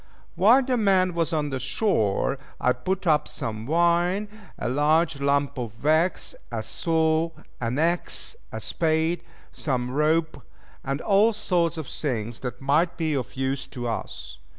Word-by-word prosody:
While 235 +8 +5
the 255 -1 0
man 190 -4 +3
was 165 -2 0
on 150 -4 -1
shore 130 - 0 0.2
I 125 - +3
put 185 +10 -3
up 150 -3 +3
some 110 0 -4
wine, 175 +5 +2 0.3
a - - -3
large 150 +3 +2
lump 140 -1 +1
of 115 -1 -7
wax, 160 +4 +2 0.2
a 110 -2 -3
saw, 160 +7 +1 0.3
an 120 +2 -2
axe, 170 - 0 0.2
a - - -5
spade, 160 +1 0 0.3
some 125 -4 -2
rope, 155 +1 +1 0.4
and 135 +2 -2
all 210 +2 +4
sorts 175 -5 0
of 160 - -4
things 120 -5 -3
that 125 -2 -5
might 150 +6 +1
be 160 -2 0
of 130 -4 -3
use 135 +1 -2
to 120 -3 -5
us. - - -5
155 Hz, 150 wpm, -25 LUFS, 130-170 Hz, 0.4 s, While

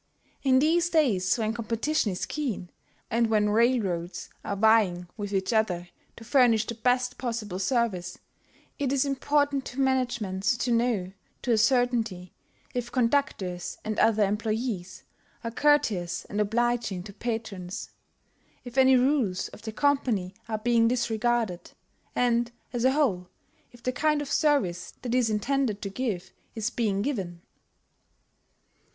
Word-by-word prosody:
In 260 -2 +4
these 335 +5 +3
days 230 - +2
when 220 -1 -1
competition 230 +2 0
is 180 - -3
keen, 240 -12 -4 0.4
and 230 0 +2
when 210 -1 +3
railroads 200 -7 0
are 200 - -3
vying 200 -4 +3
with 205 -2 -5
each 195 +2 0
other 180 -6 0 0.3
to 230 - -12
furnish 235 -3 +4
the 235 - -4
best 250 +2 0
possible 225 -7 -3
service, 190 -5 0 0.6
it 275 -2 0
is 275 0 +2
important 285 0 +1
to 250 - -7
managements 240 -6 0
to 245 - -1
know 230 -6 +1 0.3
to 245 - 0
a 225 - +4
certainty 230 -6 +1 0.4
if 240 -1 -3
conductors 230 -9 0
and 215 0 -2
other 220 -1 +4
employees 210 -2 -2 0.4
are 230 - -3
courteous 230 - +1
and 205 +1 -2
obliging 225 -3 0
to 200 0 -10
patrons, 215 -6 -5 0.7
if 250 +1 -2
any 265 0 +6
rules 250 -8 +1
of - - -13
the 220 0 -5
company 235 -8 +1 0.2
are 220 - -1
being 230 +1 +3
disregarded, 230 -5 0 0.4
and, 240 -1 +2 0.2
as 240 -1 -1
a 260 - +5
whole, 210 -12 +1 0.4
if 240 -1 -18
the 255 - 0
kind 300 +3 +1
of 290 -1 -5
service 185 - +1
that 245 -2 -2
it - - +3
is 235 -3 +1
intended 220 +1 0
to 200 - -4
give 205 -5 -3 0.2
is 220 +1 -2
being 205 -4 0
given. 185 -11 -3
230 Hz, 145 wpm, -27 LUFS, 200-255 Hz, 0.7 s, any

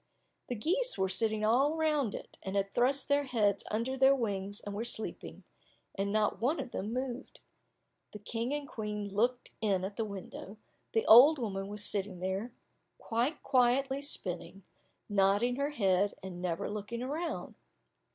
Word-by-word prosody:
The 245 - -3
geese 365 - +1
were 190 - +1
sitting 215 +2 +2
all 270 +8 +3
round 300 -8 +1
it, - - -9
and 190 +1 -5
had 195 0 0
thrust 260 +3 +2
their 285 0 +2
heads 210 -6 +1
under 230 +5 -1
their 265 +1 +5
wings 205 -4 -2
and 205 - -7
were 210 +3 -3
sleeping, 230 -2 -3 0.5
and 200 0 -2
not 215 0 +1
one 275 +8 +1
of - - -5
them 205 +3 -4
moved. 255 +1 -5 0.7
The - - -8
King 230 +4 -3
and 290 -1 -2
Queen 210 -3 -4
looked 240 +4 0
in 195 -4 +1
at 200 +1 -7
the 225 - 0
window, 200 0 -8 0.4
the 225 - +1
old 275 +8 +9
woman 195 -6 -3
was 210 0 -4
sitting 195 -3 -1
there 190 +6 -3 0.5
quite 240 +7 -1
quietly 265 +1 +2
spinning, 185 -8 -2 0.4
nodding 205 +5 +2
her 280 +1 0
head 200 -7 +1
and 180 -2 -7
never 175 -2 -2
looking 210 +3 -5
round. 310 +6 -4
220 Hz, 160 wpm, -32 LUFS, 200-260 Hz, 0.7 s, old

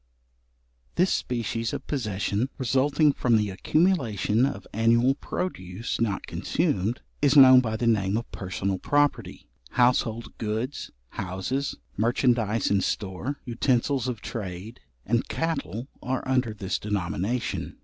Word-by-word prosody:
This 180 +2 +3
species 115 -1 -2
of - - -5
possession, 105 -2 -1
resulting 140 +3 +3
from 120 -4 +2
the 105 -2 0
accumulation 125 - +2
of 100 -8 -6
annual 115 +4 +4
produce, 115 - -4
not 105 -4 0
consumed, 105 +7 -1 0.2
is 145 0 +4
known 130 -2 +10
by 110 -3 -1
the 120 - -1
name 105 -3 +2
of 115 - -5
personal 95 0 -3
property. 145 +5 0 0.3
Household 120 -2 +1
goods, 115 +6 -3 0.2
houses, 95 +10 -3 0.2
merchandize 115 -2 +2
in 100 -1 +3
store, 105 +9 -3
utensils 125 +1 +1
of 120 -5 -4
trade, 100 0 -6 0.3
and 120 +3 +1
cattle 130 - -2
are 130 +1 -3
under 125 -4 +1
this 95 -2 -2
denomination. 100 +3 -2
115 Hz, 120 wpm, -26 LUFS, 100-130 Hz, 0.3 s, known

